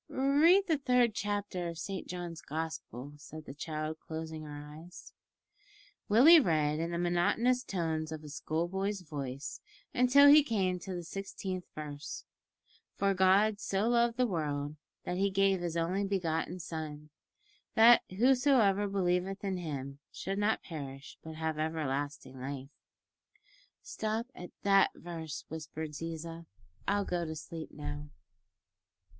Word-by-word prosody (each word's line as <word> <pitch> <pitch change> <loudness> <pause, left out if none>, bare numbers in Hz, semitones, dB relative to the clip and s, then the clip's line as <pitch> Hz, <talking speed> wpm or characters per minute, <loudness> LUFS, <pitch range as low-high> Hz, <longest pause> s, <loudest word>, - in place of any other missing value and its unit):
"Read 305 +9 +4
the 320 -6 +1
third 250 -4 +3
chapter 205 -4 -2
of 165 - -7
Saint 195 +2 -5
John's 175 -2 -6
Gospel," 150 -4 -5
said 155 +1 -10
the 135 - -8
child, 155 +1 -4
closing 160 0 -6
her 150 -1 -7 0.2
eyes. 170 +3 -12 1.0
Willie 280 +11 +9
read 155 - +1
in 165 +1 -1
the 170 - -2
monotonous 175 +9 +2
tones 160 -5 -2
of 155 -1 -6
a - - -9
schoolboy's 185 +7 -2
voice 140 -4 -6 0.3
until 250 +3 +6
he 295 +1 +9
came 190 -8 0
to 185 0 -6
the 175 - -4
sixteenth 190 0 -5
verse, 150 -1 -6 0.7
"For 195 0 +2
God 195 +3 +4
so 205 +1 0
loved 235 0 +3
the 255 - +3
world, 150 -7 -2 0.3
that 180 - -3
He 200 +1 +2
gave 195 -1 +2
His 170 -1 -2
only 180 +4 0
begotten 180 -3 -1
Son, 155 -3 -6 0.6
that 235 +1 +8
whosoever 230 -2 +4
believeth 190 0 0
in 195 -2 -1
Him 140 -5 -5
should 195 +2 -4
not 210 +2 +1
perish, 140 -4 -8
but 160 0 -8
have 160 -1 -2
everlasting 145 -4 -3
life." 135 0 -5 1.1
"Stop 220 +3 -3
at 180 - -9
that 195 -1 +5
verse," 165 -3 -7
whispered 160 0 -6
Ziza. 165 +1 -6 0.4
"I'll 205 0 +1
go 175 -2 -1
to 160 -1 -4
sleep 160 +1 -7
now." 75 0 -6
175 Hz, 140 wpm, -32 LUFS, 155-200 Hz, 1.1 s, Willie